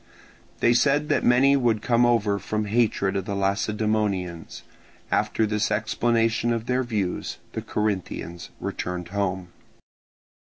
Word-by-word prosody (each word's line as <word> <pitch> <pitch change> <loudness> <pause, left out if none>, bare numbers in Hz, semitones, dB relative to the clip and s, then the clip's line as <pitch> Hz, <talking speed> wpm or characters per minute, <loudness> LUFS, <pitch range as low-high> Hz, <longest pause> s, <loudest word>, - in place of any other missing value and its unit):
They 120 - +5
said 145 +4 +2
that - - +2
many 130 +3 +5
would 115 -5 +1
come 120 0 +3
over 105 -4 +2
from 105 +3 -2
hatred 105 -3 +1
of 95 -1 -2
the 100 - -3
Lacedaemonians. 100 -3 -1 0.5
After 110 - +1
this 105 0 0
explanation 115 +2 +1
of 115 -1 -1
their 125 +1 +1
views, 105 -7 -2 0.2
the - - -3
Corinthians 95 -5 -3
returned 90 -1 -4
home. 95 -2 -2
105 Hz, 125 wpm, -25 LUFS, 100-120 Hz, 0.5 s, They